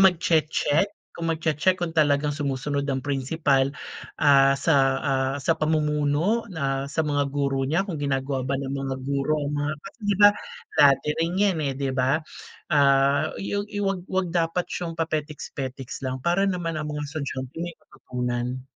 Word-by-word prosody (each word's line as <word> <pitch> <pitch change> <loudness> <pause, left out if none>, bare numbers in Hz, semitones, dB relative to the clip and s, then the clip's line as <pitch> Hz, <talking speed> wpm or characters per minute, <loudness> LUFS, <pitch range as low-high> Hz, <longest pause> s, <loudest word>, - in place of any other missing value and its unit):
magche-check. 165 -2 +3 0.2
Kung 165 -1 -4
magche-check 160 +3 +1
kung 175 -3 -3
talagang 145 -2 +2
sumusunod 140 0 -2
ang 135 0 -2
principal, 135 0 +1 0.5
ah, 135 -1 +5
sa, 145 +2 +2 0.2
ah, 135 0 0
sa 145 +4 +1
pamumuno 155 +6 +1
na 140 -5 -2
sa 155 +2 -1
mga 145 -1 0
guro 135 -1 -1
niya. 170 +6 +1
Kung 170 -7 -5
ginagawa 135 -1 -1
ba 140 - +1
ng 135 0 -4
mga 135 -1 -3
guro 140 +2 0
ang 145 - -3
mga 145 +1 -1
kasi, - - -11
'di 200 - +2
ba, 205 - +10 0.5
dati 140 +1 +5
rin 165 +1 0
'yan, 200 -3 +3
eh, 140 -2 -1
'di 135 -1 -1
ba? 130 +2 +2 0.6
Ah, 140 +1 +4
i 195 - -5
yog 205 +1 -2
i 205 -1 -4
'wag 195 -2 0
'wag 190 -1 0
dapat 170 +1 0
siyang 170 -2 -4
papetiks-petiks 145 -4 -4
lang 130 0 -2
para 195 +3 +2
naman 165 -4 -2
ang 150 - -4
mga 150 0 -3
estudyante 135 -4 -5
may 170 -1 -5
matutunan. 125 0 -4
145 Hz, 165 wpm, -25 LUFS, 135-165 Hz, 0.6 s, ba